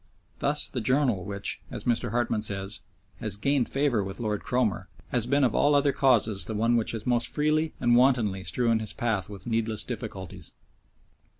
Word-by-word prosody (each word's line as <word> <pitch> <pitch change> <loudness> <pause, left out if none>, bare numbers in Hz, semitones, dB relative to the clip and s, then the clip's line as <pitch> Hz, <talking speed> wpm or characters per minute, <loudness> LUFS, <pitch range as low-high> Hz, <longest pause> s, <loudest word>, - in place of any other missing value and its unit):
Thus 145 +1 +1
the 125 - -4
journal 125 -5 +1
which, 100 0 -2
as - - -6
Mr. 120 0 0
Hartmann 115 -1 0
says, 100 -1 -2 0.4
has 110 -5 -3
"gained 135 +4 +1
favour 135 -7 +1
with 95 +3 -7
Lord 105 -3 -2
Cromer," 105 -8 -1 0.2
has 120 -2 +1
been 140 +2 +2
of 120 -4 +2
all 145 0 +3
other 140 0 +3
causes 115 -7 +2
the 110 - -4
one 115 +3 +2
which 115 -1 +2
has 110 -2 -5
most 120 -1 +1
freely 155 +1 0
and 120 -1 +3
wantonly 120 -7 +3
strewn 115 +1 +1
his 110 -1 -2
path 110 -5 -1
with 100 -3 -10
needless 110 -2 0
difficulties. 95 -6 -7
115 Hz, 180 wpm, -27 LUFS, 105-130 Hz, 0.4 s, all